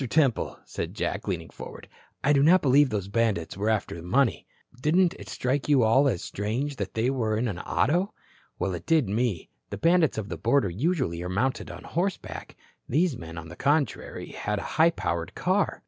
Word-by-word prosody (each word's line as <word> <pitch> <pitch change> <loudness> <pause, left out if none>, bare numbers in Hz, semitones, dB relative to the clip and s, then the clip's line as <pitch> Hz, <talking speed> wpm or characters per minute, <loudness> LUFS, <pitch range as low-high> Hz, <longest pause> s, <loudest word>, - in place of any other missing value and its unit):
Temple," 140 -6 +2
said - - -5
Jack, - - -2
leaning - - -3
forward, - - -10 0.4
"I 145 - +4
do 140 - +4
not 175 +6 +5
believe 140 +1 +5
those 100 -4 -2
bandits 105 -6 0
were 105 +3 0
after 105 -6 -1
money. 120 +9 +1 0.3
Didn't 170 +4 +3
it - - -10
strike 135 +3 -1
you 140 -5 +5
all 130 +6 +5
as 100 -10 0
strange 125 +8 -3
that 100 -2 -4
they 115 +4 +1
were 110 -5 0
in 120 +3 0
an 95 -5 -3
auto? 175 - +1 0.5
Well, 95 +1 -1
it 85 -1 -7
did 155 -8 +3
me. 105 -3 -1 0.2
The - - -5
bandits 165 -4 +3
of 105 -2 -3
the - - -4
border 115 -5 +2
usually 125 - -1
are 90 - -4
mounted 125 +8 -1
on - - -9
horseback. 180 +3 -3 0.3
These 160 +1 +2
men, 80 -4 -9
on 80 0 -7
the 85 - -9
contrary, 145 - -1
had 105 0 -2
a - - -4
high 160 +1 +5
powered 85 - -3
car. - - +1
125 Hz, 195 wpm, -27 LUFS, 100-145 Hz, 0.5 s, not